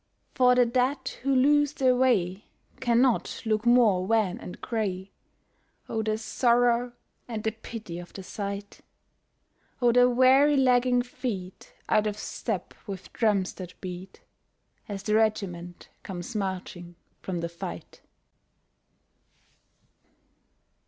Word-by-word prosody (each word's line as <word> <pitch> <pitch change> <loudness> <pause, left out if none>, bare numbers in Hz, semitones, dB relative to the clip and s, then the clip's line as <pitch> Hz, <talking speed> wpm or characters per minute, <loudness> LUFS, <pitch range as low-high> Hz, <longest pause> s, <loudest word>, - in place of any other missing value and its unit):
For 250 -1 +4
the 250 -1 +5
dead 255 +3 0
who 275 +1 +1
lose 290 +2 +4
their 260 -4 +3
way 205 -7 +1 0.3
cannot 240 0 +1
look 220 +1 0
more 230 -7 +5
wan 210 -2 +1
and 180 - -9
gray. 195 -5 -3 0.8
Oh 220 - -2
the 215 0 -1
sorrow 240 +1 +2 0.3
and 220 -3 -5
the 220 - 0
pity 220 -5 -8
of 175 - -10
the 195 - -9
sight, 200 +1 -6 1.0
Oh 245 -1 +4
the 245 +1 +5
weary 265 +4 +5
lagging 250 -1 +3
feet 230 -7 -6
out 215 0 +2
of 210 0 -3
step - - -4
with 195 -2 -8
drums 205 -5 +1
that 180 -1 -10
beat, 185 - -8 0.7
As 200 -2 -5
the 210 - -1
regiment 195 -6 -1
comes 185 +3 -7
marching 185 -3 -4 0.3
from 180 -3 -4
the 170 - -2
fight. 170 - -8
220 Hz, 120 wpm, -27 LUFS, 190-250 Hz, 1.0 s, the